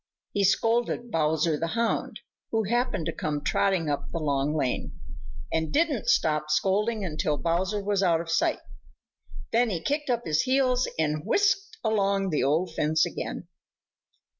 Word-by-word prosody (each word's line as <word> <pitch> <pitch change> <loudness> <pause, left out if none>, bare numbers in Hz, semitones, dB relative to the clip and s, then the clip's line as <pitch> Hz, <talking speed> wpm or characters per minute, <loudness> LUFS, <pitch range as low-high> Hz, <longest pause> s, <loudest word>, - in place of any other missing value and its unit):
He 200 - +1
scolded 230 +4 +1
Bowser 155 0 +1
the 165 - -1
Hound, 230 -1 -1 0.3
who 225 -1 0
happened 240 -5 0
to 165 - -1
come 150 -1 -3
trotting 190 -2 +1
up 145 -1 -2
the - - -3
Long 145 -1 0
Lane, 130 -5 -2 0.5
and 160 -1 0
didn't 300 -6 +1
stop 150 -1 +2
scolding 200 +7 +1
until 155 -3 -1
Bowser 185 +6 -1
was 200 -1 +1
out 170 -4 +3
of 165 0 -5
sight. 165 - +1 0.9
Then 235 +1 +3
he 180 -5 -2
kicked 290 - -2
up 240 -1 0
his 155 +1 +2
heels 255 -1 +2
and 155 -1 0
whisked 410 - +1
along 195 -3 +1
the 150 - +1
old 160 +5 +1
fence 155 0 +2
again. - - -5
185 Hz, 155 wpm, -27 LUFS, 155-230 Hz, 0.9 s, out